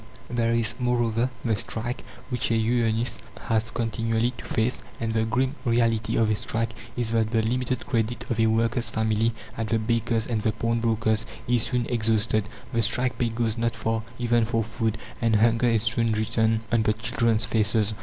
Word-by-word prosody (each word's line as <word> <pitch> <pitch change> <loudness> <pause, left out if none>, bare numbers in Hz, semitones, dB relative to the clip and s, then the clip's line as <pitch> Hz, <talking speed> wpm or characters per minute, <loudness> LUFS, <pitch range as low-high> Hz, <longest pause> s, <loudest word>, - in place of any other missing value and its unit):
(8) - - -3
There 115 -1 +2
is, 115 -1 +1
moreover, 120 -1 +1 0.2
the 115 -2 +2
strike, 115 +4 -4 0.3
which 125 -3 -1
a 115 - +2
unionist 115 0 +1 0.2
has 115 0 0
continually 115 +1 0
to - - -8
face; 115 +3 0 0.2
and 115 -1 -1
the 110 0 +2
grim 130 +4 +1
reality 115 -2 +1
of 110 -1 +3
a - - +4
strike 115 +2 -2 0.3
is, 120 -2 -1
that 115 -1 +2
the 115 -1 +1
limited 125 +2 -1
credit 115 -1 -1
of 115 - -1
a 115 - +4
worker's 115 +1 +1
family 110 0 +1 0.2
at 115 - -2
the 115 - +2
baker's 115 0 0
and 115 -3 -1
the 110 0 +1
pawnbroker's 115 -1 0 0.2
is 120 -1 +3
soon 125 0 0
exhausted, 110 -2 +1 0.2
the 115 - +2
strike 125 +4 0
pay 120 -2 +2
goes 115 0 -1
not 115 0 0
far 115 0 -1 0.2
even 120 -1 +2
for 115 0 0
food, 110 0 -2 0.2
and 115 -1 +3
hunger 115 +2 +4
is 115 -2 +2
soon 115 0 +1
written 110 0 +1
on 115 - +3
the 110 0 +2
children's 115 0 +2
faces. 110 -1 +1
115 Hz, 185 wpm, -26 LUFS, 110-115 Hz, 0.3 s, a